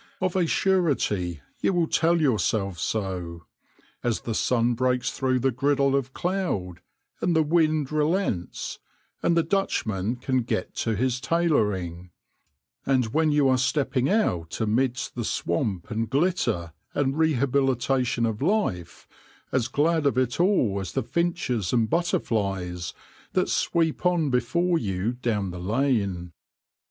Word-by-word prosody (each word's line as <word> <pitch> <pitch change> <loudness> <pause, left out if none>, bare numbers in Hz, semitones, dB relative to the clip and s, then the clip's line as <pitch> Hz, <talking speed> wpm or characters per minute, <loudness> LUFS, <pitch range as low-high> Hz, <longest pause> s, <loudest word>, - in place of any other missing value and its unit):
Of 185 -1 -1
a 180 -3 +2
surety 125 - +1 0.2
you - - +1
will 175 -2 +2
tell 170 +2 +2
yourself 105 - +1
so, 90 -2 -3 0.6
as 120 -2 0
the 115 - -3
sun 120 +1 +2
breaks 125 +1 0
through 130 -1 0
the 135 +1 +2
griddle 140 +2 +2
of 135 -1 -1
cloud, 170 - -2 0.4
and 175 - +1
the 160 - +4
wind 155 -2 +2
relents, 155 - -1 0.4
and 170 0 +2
the 165 - +4
Dutchman 115 - -1
can 130 +1 0
get 115 -5 -3
to 115 -2 0
his 125 +3 0
tailoring; 105 - 0 0.7
and 125 -4 +1
when 155 0 +3
you 145 -2 +3
are 130 -1 +3
stepping 130 -1 +1
out 90 - 0
amidst 120 +4 0
the 120 - -3
swamp 90 +1 -2
and 110 +1 -1
glitter 135 - 0 0.2
and 135 -1 +1
rehabilitation 135 -4 +1
of 110 0 -2
life, 150 - -1 0.4
as 125 -3 +1
glad 155 +3 +2
of 140 - 0
it 130 +1 0
all 170 - +2
as 95 - -5
the 135 - 0
finches 130 - -1
and 115 -3 +2
butterflies 100 - -1 0.4
that - - +1
sweep 165 -2 0
on 175 -5 +2
before 170 +8 +1
you 100 0 -1
down 110 -6 -2
the 90 - -7
lane. 100 -5 0
130 Hz, 140 wpm, -25 LUFS, 105-155 Hz, 0.7 s, the